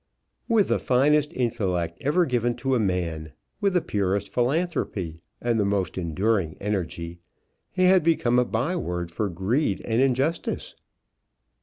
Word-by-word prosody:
With 220 -4 +3
the - - +2
finest 145 +4 +3
intellect 90 - -1
ever 170 +6 +2
given 120 -3 0
to 135 0 -1
a 125 - +3
man, 85 -6 -2 0.3
with 200 -3 +1
the 180 - +4
purest 100 -3 -1
philanthropy 120 - -1 0.2
and 120 -2 0
the - - +3
most 100 -3 0
enduring 95 0 0
energy, 85 -4 -3 0.5
he 185 - 0
had 185 0 +6
become 135 -7 +2
a 125 - +3
by 125 +11 -1
word 90 - -3
for 105 +3 -1
greed 95 - 0
and 115 +1 +1
injustice. 135 +5 0
115 Hz, 145 wpm, -25 LUFS, 90-145 Hz, 0.5 s, had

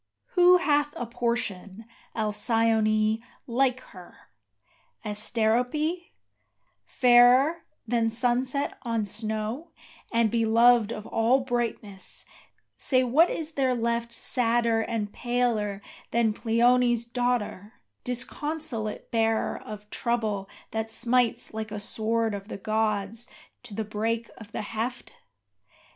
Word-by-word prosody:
Who 360 0 +6
hath 295 -3 +1
a 245 - -3
portion, 230 -4 -3 0.3
Alcyone, 220 0 +2 0.2
like 255 +1 +1
her? 180 -2 -15 0.7
Asterope, 240 - 0 0.8
fairer 250 +6 +4 0.2
Than 230 -1 +1
sunset 250 +4 0
on 230 -4 -1
snow, 220 - -3 0.4
and 230 -2 +2
beloved 230 0 +4
of 215 -2 -6
all 240 +4 +2
brightness, 235 -6 -3 0.5
say 255 -2 +2
what 295 +8 +4
is 320 -1 -4
there 265 -4 +1
left 235 0 -1
Sadder 235 -1 +1
and 220 -3 -3
paler 230 -5 -1 0.3
than 230 -2 +2
Pleione's 240 +1 +2
daughter, 235 -4 -2 0.3
disconsolate 250 -2 -3
bearer 225 -1 +1
Of 210 -1 -9
trouble 215 -5 -1 0.2
that 220 0 -3
smites 240 0 +1
like 220 0 -4
a 210 - -4
sword 225 +2 0
of 200 0 -6
the - - -6
gods 215 +1 -1 0.3
to 205 - -9
the 220 0 -2
break 225 +2 -2
of 220 -1 -12
the - - -4
heft? 230 +4 -4
230 Hz, 110 wpm, -26 LUFS, 215-245 Hz, 0.8 s, Who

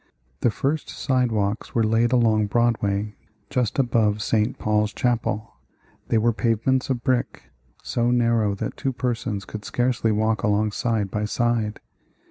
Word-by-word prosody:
The - - +3
first 140 +7 -2
sidewalks 115 -5 -1
were 115 - +3
laid 115 +2 +2
along 110 -4 +3
Broadway, 105 -2 0 0.4
just 125 -5 0
above 110 -5 +2
St. 110 -1 +1
Paul's 105 0 0
Chapel. 115 -3 -1 0.5
They 115 - +2
were 115 +1 +2
pavements 115 +5 +1
of 120 -3 -1
brick, 125 -2 -1 0.3
so 120 0 0
narrow 115 -4 +2
that - - -4
two 135 - -2
persons 115 -5 -2
could 105 -1 -7
scarcely 120 -2 0
walk 110 +1 +1
along 105 -1 +1
side 110 -3 -1
by 105 0 -1
side. 115 -1 -1
115 Hz, 140 wpm, -24 LUFS, 105-120 Hz, 0.5 s, The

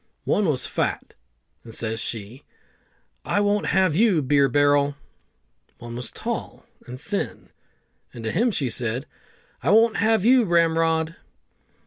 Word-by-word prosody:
One 205 -2 +1
was 135 -5 -1
fat, - - -3 0.5
and 115 - -9
says 110 0 -3
she, 115 +5 -5 0.8
"I - - 0
won't 205 0 +1
have 185 -5 +2
you, 195 -6 +3
Beer 140 0 +3
barrel!" 145 +1 +2 0.8
One 120 0 -9
was 125 +1 -5
tall - - -6 0.2
and 125 +1 -8
thin, 200 +6 -5 0.6
and 115 - -10
to 110 - -2
him 235 +7 +2
she 150 - -1
said, 120 +2 -3 0.6
"I - - 0
won't 225 +1 +4
have 220 -1 +2
you, 250 +1 +6
Ramrod!" 165 -2 +1
155 Hz, 135 wpm, -23 LUFS, 125-205 Hz, 0.8 s, you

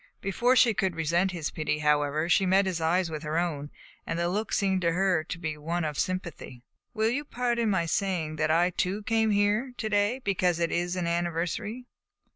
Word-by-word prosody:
Before 240 +7 +1
she 240 -3 +5
could 190 -4 -1
resent 170 +4 +1
this 170 -5 -4
pity, 155 -1 -1
however, 150 +1 +1
she 185 +2 +3
met 190 +2 +4
his 180 -3 -2
eyes 170 +1 +1
with 155 -1 -4
her 155 0 -2
own, 150 -4 -2 0.3
and 165 - -3
the 170 0 0
look 210 +4 -2
seemed 190 -2 +1
to 170 -1 +1
her 180 -2 +2
to 180 - -5
be 160 -3 -4
one 165 +2 -2
of 150 -2 -3
sympathy. 170 -9 -4 0.3
"Will 220 +1 +2
you 285 +4 -1
pardon 240 -4 -1
my 190 -4 +1
saying 165 -3 -1
that 155 0 +1
I 170 +3 +3
too 190 +4 -2
came 225 +1 +1
here 210 +5 +1
to 220 -1 -3
day 205 +3 +2
because 180 -3 +1
it 170 -1 0
is 175 +1 -1
an 180 -2 -2
anniversary?" 175 +7 -2
180 Hz, 205 wpm, -28 LUFS, 165-205 Hz, 0.3 s, she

